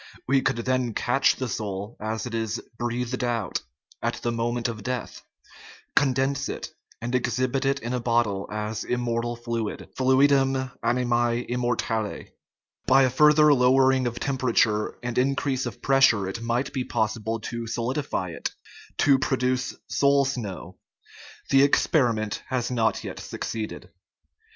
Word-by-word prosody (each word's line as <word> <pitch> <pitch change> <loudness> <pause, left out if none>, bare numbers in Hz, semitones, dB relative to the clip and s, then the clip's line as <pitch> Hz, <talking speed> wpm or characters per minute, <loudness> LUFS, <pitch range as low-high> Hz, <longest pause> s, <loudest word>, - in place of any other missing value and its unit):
We 135 +1 +3
could 135 -1 +1
then 125 -1 -1
catch 130 +3 +2
the 130 - -3
soul 105 -1 -4
as 110 +2 -3
it 120 - -6
is 115 0 -2
" 115 - -35
breathed 120 +1 -2
out 115 -6 -1 0.2
" 75 -4 -30
at - - -1
the 120 - -2
moment 120 +1 -1
of 115 -3 -5
death, 125 +3 -4 0.7
condense 135 0 +1
it, - - -5 0.3
and 120 +2 -4
exhibit 125 +2 0
it 135 0 +2
in 120 +2 -3
a 125 - 0
bottle 115 -5 0
as 105 0 -3
"immortal 120 -1 -1
fluid 115 -2 -4
" - - -40
(Fluidum 135 0 +3
animae 120 0 +1
immortale). 120 -3 -2 0.6
By 135 +1 +6
a 130 - +2
further 150 +2 +6
lowering 130 0 +4
of 120 0 -4
temperature 120 -5 +1
and 125 0 -1
increase 135 0 0
of 120 0 -9
pressure 135 -8 +4
it 95 +4 -5
might 120 +3 -1
be 130 - -1
possible 110 0 -1
to 115 +1 -5
solidify 120 -4 -2
it - - -5 0.4
to 140 -2 +4
produce 130 -2 0
" - - -58
soul 140 0 +5
snow. 105 -9 -5 0.3
" - - -18
The 135 - +6
experiment 120 -7 +2
has 125 -1 -1
not 115 -2 +1
yet - - -6
succeeded. 110 -1 -5
120 Hz, 150 wpm, -25 LUFS, 115-130 Hz, 0.7 s, By